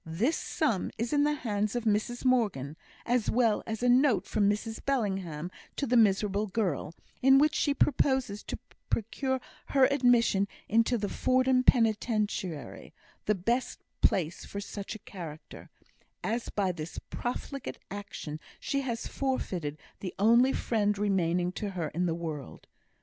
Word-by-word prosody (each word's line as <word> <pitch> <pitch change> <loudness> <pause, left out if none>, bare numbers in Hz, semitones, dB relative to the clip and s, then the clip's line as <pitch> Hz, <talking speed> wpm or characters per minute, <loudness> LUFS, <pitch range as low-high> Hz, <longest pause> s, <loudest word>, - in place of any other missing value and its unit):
This 205 - 0
sum 230 - 0
is 230 +5 -2
in 290 0 +4
the 300 - +2
hands 215 -4 -1
of 240 - -1
Mrs 225 +3 0
Morgan, 205 - +1 0.3
as 240 -2 +1
well 230 -3 +3
as 225 +1 -3
a - - +3
note 250 -1 +4
from 205 -2 +2
Mrs 220 +2 -2
Bellingham 190 - -1 0.2
to 280 - -1
the 250 - +1
miserable 210 -1 +3
girl, 180 -6 -2 0.3
in 270 +1 +7
which 300 +2 +4
she 285 -2 +1
proposes 265 -7 +1
to - - -4 0.3
procure 260 +4 -1 0.3
her 270 -2 +5
admission 240 -7 +4 0.2
into 230 +3 +3
the 205 -2 -2
Fordham 255 +3 +2
Penitentiary, 215 - 0 0.3
the 210 - +3
best 235 +7 -1 0.2
place 175 -2 +1
for 200 - -6
such 200 +1 -6
a 215 - -12
character, 165 -5 -9 0.5
as 230 +2 -2
by 195 -3 0
this 160 -1 -7
profligate 260 +2 -4
action 195 -6 -6 0.2
she 275 - -1
has 235 -4 -3
forfeited 180 - -2 0.2
the 185 - -6
only 235 +6 +5
friend 210 -5 0
remaining 180 -3 +1
to 205 +2 -4
her 175 -5 -3
in 180 +4 -1
the 165 - 0
world. 155 -5 -6
215 Hz, 150 wpm, -30 LUFS, 190-250 Hz, 0.5 s, in